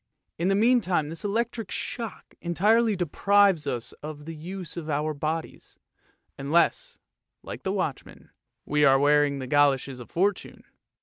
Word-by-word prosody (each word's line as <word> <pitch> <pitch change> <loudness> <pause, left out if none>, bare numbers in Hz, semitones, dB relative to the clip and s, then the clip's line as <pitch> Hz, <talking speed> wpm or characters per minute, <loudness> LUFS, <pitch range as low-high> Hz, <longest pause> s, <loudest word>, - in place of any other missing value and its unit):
In 170 - +1
the 195 - +3
meantime 200 -9 +2
this 165 +1 -7
electric 225 +1 -2
shock 230 -4 -6
entirely 210 +6 +2
deprives 195 0 +2
us 120 -2 -3
of 150 -1 -8
the 165 - -6
use 175 +3 -7
of 165 -3 -6
our 150 +1 -1
bodies, 155 +3 -5 0.6
unless, 150 +5 +1 0.5
like - - -8
the - - -2
watchman, - - -4 0.3
we 150 0 +1
are 135 -1 +6
wearing 145 0 +3
the 130 - -5
goloshes 135 -1 +2
of 120 - -11
Fortune. 195 +3 -1
165 Hz, 140 wpm, -26 LUFS, 145-200 Hz, 0.6 s, are